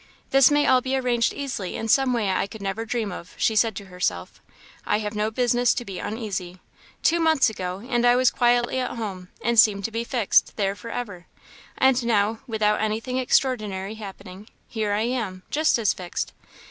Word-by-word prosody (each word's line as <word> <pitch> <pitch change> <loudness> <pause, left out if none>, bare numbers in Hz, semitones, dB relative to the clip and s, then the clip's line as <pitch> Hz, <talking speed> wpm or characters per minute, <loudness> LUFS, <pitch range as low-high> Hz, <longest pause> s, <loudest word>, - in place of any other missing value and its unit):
"This 270 -1 +6
may 290 0 +3
all 255 -1 +4
be 260 +1 -1
arranged 245 -3 +1
easily 255 -10 -4
in 225 - -4
some 265 +3 +3
way 220 -5 0
I 185 - 0
could 220 - -10
never 200 +3 -3
dream 225 -3 -2
of," 180 0 -9
she 220 - +1
said 220 -1 +2
to 200 - -7
herself; 175 - -3 0.4
"I 210 - +1
have 210 0 -4
no 210 0 0
business 245 +1 +2
to 240 - -4
be 195 -3 -6
uneasy. 195 -5 -5 0.5
Two 340 +1 +3
months 320 -7 +3
ago, 185 +1 -5
and 240 -2 0
I 245 0 +5
was 255 -1 +4
quietly 240 0 +2
at 250 -1 -3
home, 190 -5 -6
and 235 -1 +3
seemed 200 -3 +5
to 225 - -3
be 230 +1 -2
fixed 235 -4 +1
there 195 -2 0
for 200 +4 -10
ever; 200 -8 -6 0.5
and 260 -1 +3
now, 210 -3 +2
and 225 - -6
without 215 -2 +1
anything 225 +4 -1
extraordinary 215 -7 0
happening, 200 -2 -10 0.2
here 215 -2 -2
I 205 +1 +1
am 225 -7 -3
just 310 -2 +2
as 220 -4 +2
fixed. 180 -2 -5
220 Hz, 200 wpm, -24 LUFS, 200-245 Hz, 0.5 s, This